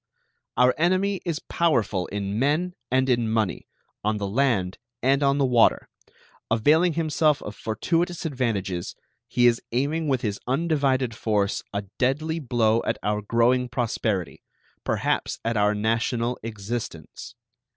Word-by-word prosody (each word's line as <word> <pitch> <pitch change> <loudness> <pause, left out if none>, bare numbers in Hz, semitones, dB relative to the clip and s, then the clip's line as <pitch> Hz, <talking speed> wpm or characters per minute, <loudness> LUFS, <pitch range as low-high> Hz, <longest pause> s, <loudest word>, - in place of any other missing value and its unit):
Our 125 +1 +5
enemy 185 +3 +1
is 165 -2 -2
powerful 115 - +1
in 100 +1 -3
men 155 +7 +1 0.2
and 130 +1 +2
in 120 -3 +1
money, 110 -5 -1 0.4
on 105 +1 0
the 100 - -3
land 100 -5 0 0.2
and 135 +2 +3
on 140 0 +3
the 140 - +3
water. 125 -3 +3 0.6
Availing 155 +10 +3
himself 155 -2 +2
of 105 - -7
fortuitous 170 - -1
advantages, 110 - -2 0.3
he 120 - +2
is 120 -1 +4
aiming 145 +6 0
with 130 -3 +1
his 105 -2 -2
undivided 135 -4 +1
force 105 -3 0
a 100 0 -3 0.2
deadly 155 +6 0
blow 115 -5 +2
at - - -1
our 105 0 0
growing 120 +4 +2
prosperity, 110 - -2 0.4
perhaps - - -1
at 115 0 0
our 105 0 +2
national 115 +3 0
existence. 110 +1 -6
120 Hz, 135 wpm, -25 LUFS, 110-145 Hz, 0.6 s, Our